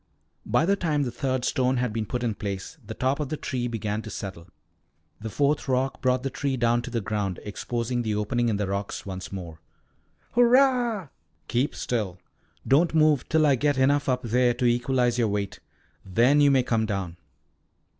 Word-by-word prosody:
By 120 +9 +3
the 200 +3 +3
time 155 -6 0
the 125 - -3
third 130 +1 -2
stone 130 0 +1
had 125 -3 -1
been 110 -1 -2
put 125 +2 -3
in 115 -2 0
place 100 +8 -6
the 110 +1 -8
top 130 +3 0
of 150 -3 -2
the 155 - -3
tree 125 -4 -3
began 110 -2 -3
to 110 - -8
settle. 95 -5 -7 0.7
The 110 +1 -5
fourth 145 +5 0
rock 130 +1 0
brought 130 -1 +1
the 135 - -2
tree 135 0 -2
down 120 0 +2
to 120 - -7
the 115 -1 -2
ground, 100 -3 -2
exposing 120 +3 -3
the 110 -3 -1
opening 120 +3 0
in 105 - 0
the 105 - -1
rocks 100 +1 -4
once 95 -1 -6
more. 85 -5 -7 0.7
"Hurrah!" 245 - +3 0.4
"Keep 125 +4 0
still. 105 -7 -2 0.5
Don't 160 +5 +3
move 155 -4 +3
till 160 -1 +3
I 145 - +5
get 145 +2 +1
enough 140 +2 +2
up 125 0 0
there 120 +1 +2
to 125 - -1
equalize 120 0 +2
your 115 - +3
weight. 100 -1 -3 0.4
Then 120 +10 +3
you 145 - +6
may 135 -2 +4
come 110 -2 0
down." 95 -5 -3
120 Hz, 190 wpm, -26 LUFS, 105-140 Hz, 0.7 s, you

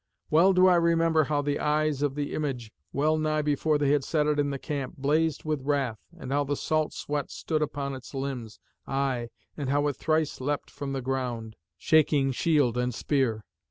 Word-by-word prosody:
Well 175 +5 +6
do 185 0 +5
I 180 -1 +6
remember 165 -2 +3
how 145 0 0
the 145 0 -1
eyes 150 -1 +1
of 145 -2 0
the 145 -1 -3
image, 130 -7 -3 0.2
well 155 +3 +1
nigh 155 0 0
before 150 +1 +1
they 145 -1 +2
had 145 -2 +2
set 150 +1 +1
it 150 -1 +1
in 145 -1 +1
the 140 - -3
camp, 140 -2 -4
blazed 150 +2 +1
with 155 -3 -1
wrath, 135 -5 -1 0.2
and 135 -5 -7
how 145 +1 +2
the 145 +1 -1
salt 155 +1 0
sweat 145 -1 -3
stood 155 -2 -2
upon 140 -2 -2
its 130 +1 -9
limbs, 130 -5 -5 0.3
aye, 135 -3 -1 0.3
and 140 -3 -3
how 145 +1 +2
it 145 -2 0
thrice 155 -3 0
leapt 145 +2 -2
from 140 -1 -5
the 135 -2 -3
ground, 125 -4 -3 0.2
shaking 145 - +3
shield 135 -4 +2
and 125 -1 -1
spear. 120 -7 0
145 Hz, 195 wpm, -27 LUFS, 135-155 Hz, 0.3 s, Well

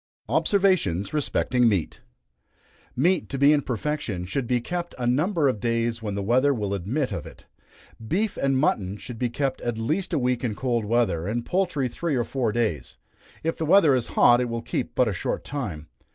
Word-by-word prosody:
Observations 180 - +2
respecting 125 -4 +2
Meat. 95 -7 -2 0.9
Meat 175 +8 +1
to 135 - -3
be 140 +2 +6
in 145 - +2
perfection 120 -8 -3
should 120 +7 -2
be 125 0 +2
kept 175 +7 -4
a 125 - -3
number 150 +6 +2
of 125 -6 0
days 115 0 -1
when 105 -3 -3
the 100 - -2
weather 130 +6 +3
will 105 -3 -2
admit 115 - -2
of - - -5
it. - - -14 0.6
Beef 200 - 0
and 135 -1 +1
mutton 100 -8 0
should 120 +1 -9
be 125 - 0
kept 135 +1 -2
at 120 -2 -2
least 155 +12 -1
a 165 - +1
week 125 -2 0
in 115 -4 -1
cold 120 -3 -1
weather, 105 -7 +1
and 120 +3 -2
poultry 180 -8 0
three 160 +4 -2
or 120 - +1
four 120 -3 -1
days. 105 - -2 0.5
If 165 +1 -1
the 160 - -2
weather 165 -4 +6
is 125 -3 0
hot, 120 0 +6
it 125 - -1
will 115 0 -4
keep 120 +1 -3
but 125 - +3
a 105 - 0
short 90 - -3
time. 100 - -5
125 Hz, 195 wpm, -25 LUFS, 110-145 Hz, 0.9 s, be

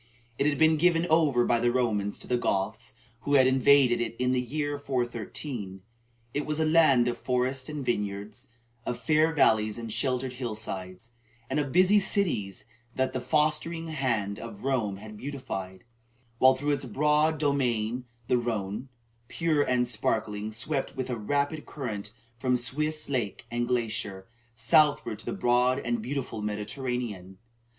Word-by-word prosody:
It 140 - +3
had 145 -2 +1
been 160 0 +4
given 170 +1 +3
over 145 -7 +4
by 120 - +2
the 120 +1 +2
Romans 110 -5 0
to - - -7
the 125 - +1
Goths, 105 +3 -2 0.2
who 145 +4 0
had 130 -2 +6
invaded 130 -1 +4
it 115 -1 -3
in 125 0 +1
the 130 -1 +2
year 145 +3 -3
413. 120 -5 -4 0.5
It 145 - -1
was 150 +1 -2
a 160 - +2
land 155 -6 +5
of 120 -1 -2
forest 130 +2 -1
and 150 -3 -5
vineyards, 105 +2 -3 0.4
of 120 - -3
fair 155 +1 +3
valleys 110 -8 +3
and 115 -2 -4
sheltered 125 +1 -1
hill 120 -3 -4
sides, 95 +1 -5 0.4
and - - +1
of 140 -2 -2
busy 185 +5 +5
cities 160 - -1 0.3
that 130 0 0
the 130 - -2
fostering 155 +4 0
hand 115 -9 -1
of 115 -2 -9
Rome 125 -7 0
had 105 +1 -10
beautified; 95 -9 -6 0.6
while 130 0 +6
through 145 +3 -1
its 140 -1 -1
broad 150 +6 +2
domain 125 -5 0 0.2
the 125 - +3
Rhone, 115 +1 -3 0.4
pure 160 -1 +1
and 125 -3 +1
sparkling, 110 -2 -1
swept 135 +6 -2
with 130 -1 -3
a - - 0
rapid 140 +7 -1
current 105 -8 -5 0.3
from 125 +1 +2
Swiss 150 +5 0
lake 120 -7 -2
and 120 0 -1
glacier, 110 -5 -2 0.3
southward 115 -1 +3
to - - -10
the - - -1
broad 125 -7 +2
and 120 -4 -2
beautiful 125 -2 -4
Mediterranean. 105 -2 -4
125 Hz, 160 wpm, -28 LUFS, 110-145 Hz, 0.6 s, had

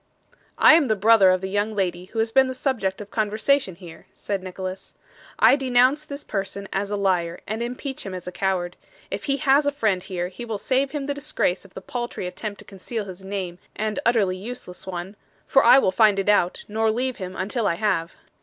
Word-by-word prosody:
'I - - +8
am 320 -2 +5
the 220 - +2
brother 210 -1 +6
of 185 0 +2
the 190 - -3
young 205 +2 -1
lady 180 -3 -1
who 220 - -11
has 225 0 +1
been 265 +2 +5
the 260 - -4
subject 215 -8 -1
of 205 - -10
conversation 215 0 +1
here,' 170 -2 -13
said 200 -2 -3
Nicholas. 185 0 -7 0.4
'I 240 +5 +6
denounce 260 +3 +3
this 285 -1 -7
person 200 -1 -4
as 200 +1 -1
a 205 - -1
liar, 180 -4 0
and 220 +2 -3
impeach 250 +3 -4
him 195 -2 -6
as 180 - -7
a 180 - -5
coward. 180 -2 -1 0.3
If - - -4
he 275 -1 +1
has 280 +2 +3
a - - +3
friend 215 -10 0
here, 180 -1 -4
he 215 +6 -9
will 225 -3 -3
save 265 +5 0
him 290 -2 -4
the 285 - -1
disgrace 285 -11 -1
of 195 - -18
the - - -7
paltry 240 -1 -5
attempt 200 +3 -5
to - - -14
conceal 205 +3 -5
his 190 0 -10
name 190 -3 -5 0.2
and 215 +3 -2
utterly 205 -6 +2
useless 190 -3 -8
one 185 +2 -5 0.3
for 270 - +4
I - - +8
will 225 -8 +3
find 210 +1 +4
it 195 +1 0
out, 185 -4 +2
nor 220 +1 +1
leave 250 +3 -1
him 185 -1 -6
until 205 +4 -1
I 170 - +1
have. 170 -4 -1
205 Hz, 220 wpm, -24 LUFS, 185-245 Hz, 0.4 s, I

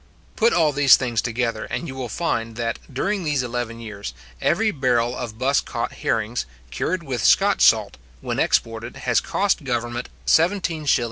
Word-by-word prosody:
Put 230 +1 +3
all 160 -3 +3
these 140 -1 +7
things 120 -4 -1
together, 115 -2 -2
and 170 - -4
you 135 - -6
will 130 -2 -5
find 115 -9 -2
that, 115 0 -2
during 195 +9 -1
these 145 -5 0
eleven 120 -1 -4
years, 100 - -7 0.3
every 215 +6 +2
barrel 125 - +1
of 115 -4 -6
buss 135 +3 +2
caught 115 - -4
herrings, 110 - -2 0.2
cured 170 - -2
with 125 -7 -3
Scotch - - +4
salt, - - +4 0.2
when - - -3
exported, 115 +1 0
has 125 -3 +3
cost 200 -5 0
government 120 -1 -3 0.2
17s:11¾d. 165 -5 +2
125 Hz, 160 wpm, -22 LUFS, 115-150 Hz, 0.3 s, these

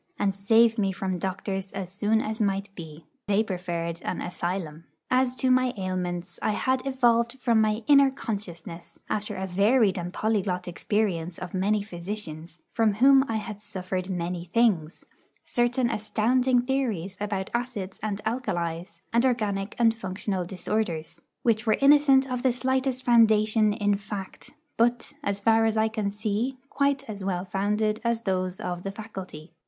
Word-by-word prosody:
and 200 -1 +1
save 225 +3 +4
me 195 -2 +2
from 190 -1 -3
doctors 190 +1 -3
as 190 -3 -5
soon 210 +3 +1
as 220 +1 -3
might 200 -1 -1
be. 160 -3 -10 0.2
They 205 +1 +3
preferred 175 -4 -4
an - - -3
'asylum.' 175 -3 -4 0.3
As 255 0 +2
to 255 +1 +1
my 255 0 +3
ailments, 180 -2 -3
I 215 - +1
had 260 +4 0
evolved 240 -2 +2
from 230 -3 +3
my 215 +1 +1
inner 280 -1 +6
consciousness, 180 -9 -6
after 210 0 -2
a 190 - -3
varied 200 +2 +3
and 175 0 -4
polyglot 195 -4 -1
experience 180 -2 -1
of 180 -1 -7
many 200 +2 +1
physicians, 175 -4 -7
from 225 -3 +2
whom 270 +4 +6
I 225 - -2
had 210 -1 -5
suffered 185 -2 -4
many 175 -1 -3
things, 180 -5 +1 0.4
certain 240 +1 +1
astounding 240 +4 +2
theories 230 -9 -1
about 200 -2 -2
acids 235 -6 -3
and 210 -1 -3
alkalies, 175 -7 -3
and 235 +1 +4
organic 210 -6 0
and 230 -2 +4
functional 190 -3 -3
disorders, 175 -3 -3 0.2
which 225 -1 +1
were 215 - +4
innocent 275 -1 +6
of 250 -2 -3
the 255 -1 +2
slightest 260 +1 -1
foundation 220 -2 +4
in 205 -1 +1
fact, 200 -1 -7 0.3
but, 240 +1 +1
as 200 0 -1
far 225 +2 +4
as 220 0 +1
I 220 0 +3
can 215 -2 -2
see, 215 +5 -2
quite 280 -1 +1
as 205 -3 -6
well 185 -1 -2
founded 210 +3 0
as 235 -1 0
those 185 -3 -1
of 175 -1 -4
the 195 - -4
faculty. 190 -7 -9
210 Hz, 160 wpm, -26 LUFS, 185-235 Hz, 0.4 s, inner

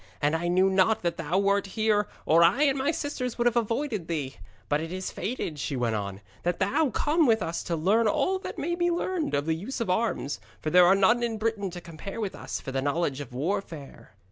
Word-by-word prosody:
And 145 +2 +1
I 170 +1 -1
knew 185 +2 +4
not 195 +3 +2
that 170 -1 -1
thou 165 +2 -1
wert 200 0 +2
here, 215 -1 +2 0.2
or 165 +2 +5
I 185 - +4
and 275 -2 +3
my 275 +1 0
sisters 285 -5 -3
would 240 - 0
have 240 -1 +3
avoided 230 - -1
thee. 145 - -3 0.3
But 145 +1 +1
it 165 +1 -5
is 185 0 -4
fated,' 185 - -4
she 140 - -2
went 120 -3 0
on, 100 -2 -4 0.2
'that 175 0 -1
thou 280 +9 +1
come 305 +4 +2
with 220 -3 +3
us 165 +1 -3
to 170 - -1
learn 205 +8 +3
all 375 - +1
that - - -7
may 345 - -2
be 345 0 +1
learned 345 - -1
of 140 +1 0
the 160 - +1
use 205 +12 -5
of 230 -6 0
arms. 180 - -1 0.2
For 155 - -3
there 180 0 +7
are 190 - +6
none 220 +5 +4
in 230 -2 -1
Britain 215 -3 -1
to 175 0 -7
compare 175 +6 -8
with 205 -4 -2
us - - -5
for 135 - -7
the 135 0 -1
knowledge 145 0 -1
of 135 - -8
warfare.' 150 - -5
190 Hz, 235 wpm, -27 LUFS, 160-230 Hz, 0.3 s, there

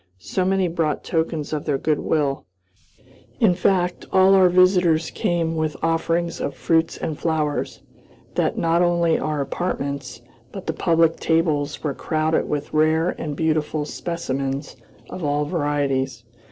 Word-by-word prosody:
So 140 - -2
many 190 0 +2
brought 165 -3 -1
tokens 160 -3 -2
of 150 - -3
their 145 -3 +1
good 155 +1 0
will 140 - -1 0.9
in 215 -6 +5
fact, 180 0 0
all 190 +1 +5
our 190 -2 +6
visitors 180 -3 +3
came 165 -2 -1
with 155 -2 -2
offerings 165 +1 0
of 140 - -3
fruits 160 +6 +1
and 155 -2 -4
flowers 155 -3 -2 0.5
that - - 0
not 165 +1 +2
only 170 -2 +2
our 150 -2 -1
apartments, 140 -5 -4 0.3
but 195 -2 -8
the - - -1
public 165 -2 +2
tables 155 -3 0
were 150 -3 -1
crowded 155 +3 0
with 150 -1 -3
rare 155 +2 +3
and 150 -2 -4
beautiful 155 -1 0
specimens 140 -4 -4 0.4
of 185 - -6
all 145 0 0
varieties. 140 -6 -1
160 Hz, 140 wpm, -22 LUFS, 145-170 Hz, 0.9 s, our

